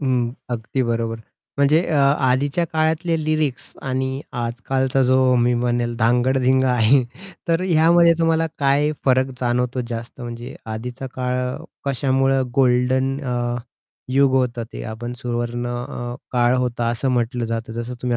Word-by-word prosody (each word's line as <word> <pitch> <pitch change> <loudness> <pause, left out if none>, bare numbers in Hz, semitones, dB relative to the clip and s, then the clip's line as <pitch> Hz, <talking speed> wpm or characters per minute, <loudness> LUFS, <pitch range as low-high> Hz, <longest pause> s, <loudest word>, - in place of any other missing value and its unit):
हं, 125 -4 0 0.2
अगदी 120 +2 -2
बरोबर. 115 -1 -1 0.4
म्हणजे 145 +3 +4
अ, 160 - -1
आधीच्या 140 +3 +2
काळातले 160 +1 +1
लिरिक्स 155 -4 -1
आणि 130 +1 -2 0.2
आजकालचा 130 +3 0
जो 130 0 +4
मी 120 0 +3
म्हणेल 120 0 0
धांगडधिंगा 130 +2 +2
आहे, 125 +3 +4 0.5
तर 165 +1 +2
ह्यामध्ये 170 -1 +5
तुम्हाला 165 0 +2
काय 145 +2 +2
फरक 130 0 +2
जाणवतो 125 +1 0
जास्त? 115 +2 -6
म्हणजे 120 +1 -7 0.2
आधीचा 125 +4 -6
काळ 125 0 -1 0.5
कशामुळं 135 0 +1
गोल्डन 130 +1 +2
अ, 120 -2 -2 0.6
युग 135 0 +4
होतं 125 -3 0
ते - - -6
आपण 120 +2 -5
सुवर्ण 120 0 -3
अ, 120 0 -5 0.2
काळ 120 0 +3
होता 120 -2 -1
असं 120 +3 -1
म्हटलं 120 0 0
जातं, 115 0 -4
जसं 120 +2 -5
तुम्ही 120 -1 0
125 Hz, 135 wpm, -21 LUFS, 120-135 Hz, 0.6 s, ह्यामध्ये